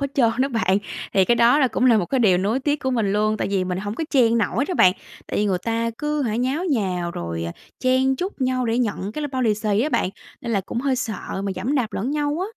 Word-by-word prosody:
hết 280 - 0
trơn 235 -5 +4
đó 270 - +2
bạn. 205 -6 +1 0.3
Thì 190 - +4
cái 240 - +3
đó 235 +4 +5
là 265 -4 +3
cũng 255 - -1
là 230 -4 +5
một 175 - -1
cái 265 -2 0
điều 190 -5 +4
nuối 210 +8 0
tiếc 290 +2 +1
của 260 - -1
mình 220 -5 0
luôn, 215 +1 +1
tại - - -2
vì 190 -2 +1
mình 180 0 -2
hổng 205 +1 -4
có 320 - -3
chen 235 -4 +4
nổi 230 +5 0
đó 365 - -3
bạn. 185 - +6 0.3
Tại - - -4
vì 210 - +2
người 190 -3 +1
ta 230 0 -1
cứ 300 0 -1
hả, 220 -4 -1
nháo 260 +8 -1
nhào 185 -8 -1
rồi, 85 - -4
à, 85 - -4 0.3
chen 260 +1 +2
chúc 365 -1 -5
nhau 255 -1 0
để 230 +2 0
nhận 210 -3 -2
cái 305 - -4
l - - 0
bao 260 -1 -1
lì 215 -3 +3
xì 210 -1 0
á 280 - +1
bạn, 185 - 0 0.3
nên 235 - -4
là 200 - +2
cũng 215 +5 -4
hơi 270 -1 0
sợ 215 -5 -4
mà 195 - -1
giẫm 270 +5 -2
đạp 235 -7 0
lẫn 235 +7 -2
nhau 295 0 -1
á. - - 0
230 Hz, 285 wpm, -22 LUFS, 200-265 Hz, 0.3 s, bạn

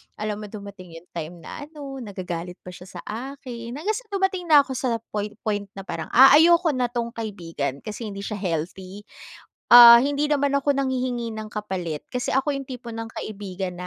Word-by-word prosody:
alam 210 0 -4
mo, 210 - -7
dumating 200 -4 -10
'yung 165 +2 -13
time 170 +1 -6
na 290 - -8
ano, 280 -3 -8
nagagalit 180 -5 -6
pa 180 - -9
siya 180 +1 -12
sa 175 - -6
akin, 245 0 -7
hanggang 405 +8 -1
sa - - -10
dumating 385 -3 -1
na 295 -3 +7
ako 270 - -9
sa 245 -3 0 0.2
point 210 0 -3
point 205 -2 -2
na 195 - -7
parang 165 -4 -5
a 265 +2 +9
ayoko 340 0 +5
na 250 -2 0
'tong 235 -1 -3
kaibigan 165 - -5
kasi 215 +1 -6
hindi 200 -1 -7
siya 210 -1 -4
healthy. 185 +3 -4 0.7
Ah, 235 -1 +11
hindi 285 +2 0
naman 285 -1 +2
ako 280 +1 +1
nanghihingi 250 -3 -2
ng 215 0 -6
kapalit 185 -7 -4
kasi 250 - -1
ako 275 +2 +1
'yung 275 - -4
tipo 250 -2 -8
ng 225 0 -6
kaibigan 190 -3 -5
225 Hz, 190 wpm, -24 LUFS, 190-270 Hz, 0.7 s, Ah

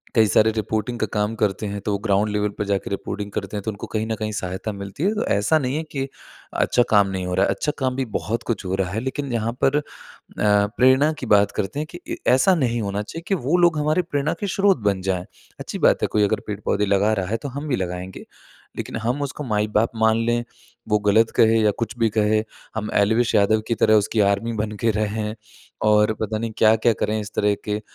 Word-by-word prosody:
कई 110 -2 +5
सारे 110 +2 +4
रिपोर्टिंग 110 +2 -2
का - - +1
काम 105 +1 0
करते 105 -1 -1
हैं 100 0 -4
तो 105 - 0
वो 100 - +1
ग्राउंड 105 0 +1
लेवल 105 0 0
पर 105 - -2
जाकर 100 -1 -2
रिपोर्टिंग 100 +1 -4
करते 100 +1 -4
हैं - - -3
तो 110 - -2
उनको 100 - -8
कहीं 110 +1 0
न 110 - -1
कहीं 110 0 -3
सहायता 95 +1 -4
मिलती 100 - -6
है। 200 +3 +2
तो 215 - -1
ऐसा 105 +11 +3
नहीं 130 0 -2
है 160 - -2
कि, 135 -1 -2 0.5
अच्छा 120 - +2
काम 100 -2 +5
नहीं 95 -1 -3
हो 90 - -3
रहा 95 - +3
है। - - -1
अच्छा 150 - -2
काम 130 -1 0
भी 135 -1 -1
बहुत 110 +8 -2
कुछ 110 -4 -2
हो 95 +1 -1
रहा 95 -1 -1
है 110 - -2
लेकिन 135 +1 -4
यहाँ 115 0 0
पर 135 +2 +4
अ, 150 - +1 0.6
प्रेरणा 125 +8 +3
की - - -5
बात 100 -3 +4
करते 105 +8 -2
हैं 155 - -3
कि - - -7
ऐ - - -1 0.2
ऐसा 180 +8 +4
नहीं 120 -6 0
होना 100 0 -2
चाहिए 165 +10 -8
कि 195 - +2
वो 175 +4 +3
लोग 175 -3 +4
हमारी 155 +4 +2
प्रेरणा 150 -2 -1
के 205 - -2
स्रोत 195 -2 +4
बन 100 -2 +1
जाए। 90 -1 -2 0.3
अच्छी - - -6
बात - - +3
है, - - +2
कोई 105 -1 +1
अगर 110 +2 +1
पेड़-पौधे 105 0 -1
लगा 100 +2 +2
रहा 95 -3 -1
है 115 - +1
तो 140 +4 -6
हम 140 +4 -6
भी 130 - +1
लगाएँगे। 90 -1 -5 0.5
लेकिन - - -5
हम 125 +5 -1
उसको 145 +1 -4
माई-बाप 105 -1 +1
मान 110 0 +3
लें, 120 0 +1 0.4
वो 105 -1 +2
गलत 110 +2 +4
कहे 115 0 +5
या 105 - +4
कुछ 115 +1 -3
भी 115 -1 +3
कहे, 110 +1 +3 0.3
हम 110 -1 -3
एल्विश 110 +3 +2
यादव 110 +1 +3
की 115 - 0
तरह 110 0 +4
उसकी 105 +2 0
आर्मी 115 +3 -2
बन 105 - -4
के 115 - +4
रहें, 105 0 -2 0.5
और 105 0 +4
पता 110 0 -1
नहीं 115 0 -3
क्या-क्या 110 +1 +4
करें 110 +1 0
इस 105 +1 -7
तरह 105 0 +2
के, 105 0 -2
110 Hz, 240 wpm, -22 LUFS, 105-120 Hz, 0.6 s, कई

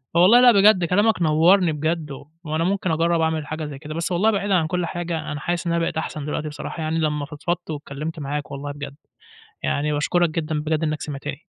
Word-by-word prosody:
والله 185 +8 +7
لأ 250 -1 +8
بجد 200 -4 +5
كلامك 205 +3 +2
نوَّرني 165 +3 +4
بجد 155 0 -2
و 135 - -9 0.2
وأنا 155 0 -1
ممكن 185 0 0
أجرّب 165 +1 +2
أعمل 160 -2 -1
حاجة 155 0 -4
زي 145 -2 -7
كده. 155 +1 -7
بس 165 +3 -3
والله 200 +6 +3
بعيدًا 200 -1 0
عن 165 -3 +2
كل 180 +1 -1
حاجة، 170 -1 -4
أنا 145 - -4
حاسِس 175 +3 -2
إن 170 - +1
أنا 170 - +1
بقيت 165 - -2
أحسن 155 -2 -4
دلوقتي 150 +1 -3
بصراحة 155 +2 -6
يعني 160 +1 -1
لمّا 150 -2 -1
فضفضت 160 +3 -4
واتكلِّمت 150 +2 -6
معاك 145 0 -4
والله 145 +1 -5
بجد. 140 -1 -8 0.7
يعني 150 +1 0
باشكُرك 170 +3 +1
جدًا 155 -1 -2
بجد 155 +1 -1
إنّك 155 -1 -2
سمعتني. 145 +1 -6
160 Hz, 210 wpm, -22 LUFS, 150-175 Hz, 0.7 s, لأ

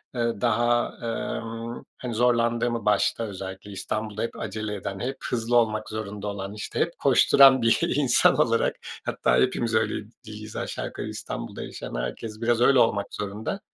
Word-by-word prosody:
eee, 115 -3 -1
daha, 120 +1 +2
emm, 115 0 -4
hani, 125 -2 -5
zorlandığımı, 120 -1 +1
başta 105 +2 +2
özellikle 95 -1 -7
İstanbul'da 105 +2 -4
hep 115 - -4
acele 110 -1 -4
eden, 95 -1 -5
hep 130 +4 -3
hızlı 120 0 0
olmak 110 -2 +1
zorunda 105 -1 -5
olan, 100 -1 -4
işte, 105 - -5
hep - - 0
koşturan 135 -2 +6
bir 115 0 +4 0.2
insan 135 -4 +4
olarak - - +2 0.3
hatta - - +1
hepimiz 120 -3 +1
öyle 110 -1 +1 0.2
diyiz 110 0 -9
aşağı - - -3
yukarı - - -6
İstanbul'da - - -6
yaşayan - - -7
herkes 85 - -5
biraz 120 0 +2
öyle 130 +1 +6
olmak 100 -4 +2
zorunda. 105 - -4
110 Hz, 155 wpm, -25 LUFS, 105-120 Hz, 0.3 s, koşturan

